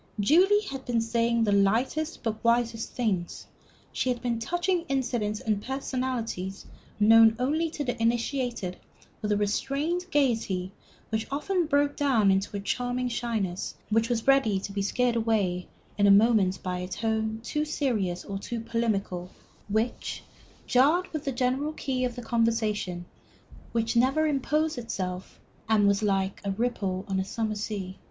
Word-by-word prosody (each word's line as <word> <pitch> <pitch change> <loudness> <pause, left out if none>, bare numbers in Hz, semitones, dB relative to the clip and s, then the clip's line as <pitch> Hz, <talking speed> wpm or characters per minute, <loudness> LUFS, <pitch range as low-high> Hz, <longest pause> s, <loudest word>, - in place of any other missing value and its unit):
Julie 365 - +5
had 270 -8 -6
been 240 -2 0
saying 230 0 +1
the 210 - +2
lightest 235 +11 +1
but 225 - +1
the 220 - -16
wisest 235 -1 +1
things; 195 -8 -2 0.5
she 255 - 0
had 245 -1 0
been 235 -2 -1
touching 350 +7 0
incidents 240 -6 -1
and 210 -2 0
personalities 250 -7 -3 0.3
known 225 +1 +7
only 310 +6 0
to 305 -2 -4
the 245 -3 -3
initiated 235 -4 -1 0.4
with 210 - -1
a 205 - +3
restrained 280 - -1
gayety 225 - 0 0.4
which 220 0 -2
often 340 +5 0
broke 285 -1 +2
down 235 -9 +3
into 195 +1 0
a - - -3
charming 245 +4 -1
shyness, 220 -6 -2 0.2
which 225 +2 +2
was 230 -2 -1
ready 270 -8 +4
to 200 - -5
be 200 0 -2
scared 240 +4 +1
away 210 -6 0 0.3
in 205 - +5
a - - +6
moment 200 -2 +4
by 180 -1 -2
a 180 - -4
tone 220 +2 -1
too 300 +5 -1
serious 220 - -1
or 195 -1 -4
too 235 +3 -4
polemical 210 -6 -2 0.4
which 220 +4 -2 0.4
jarred 305 +9 +3
with 310 -1 -4
the 275 - 0
general 260 +4 0
key 260 -4 -2
of 245 -2 -3
the 245 - -7
conversation, 220 -6 0 0.7
which 230 0 0
never 265 +6 +3
imposed 300 0 0
itself, 185 -5 -5 0.3
and 210 -2 +4
was 200 +1 +2
like 195 -2 0
the 200 - -3
ripple 195 -4 -2
on 190 -1 -1
a - - +1
summer 215 +2 -2
sea. 200 -3 -5
230 Hz, 160 wpm, -27 LUFS, 205-260 Hz, 0.7 s, known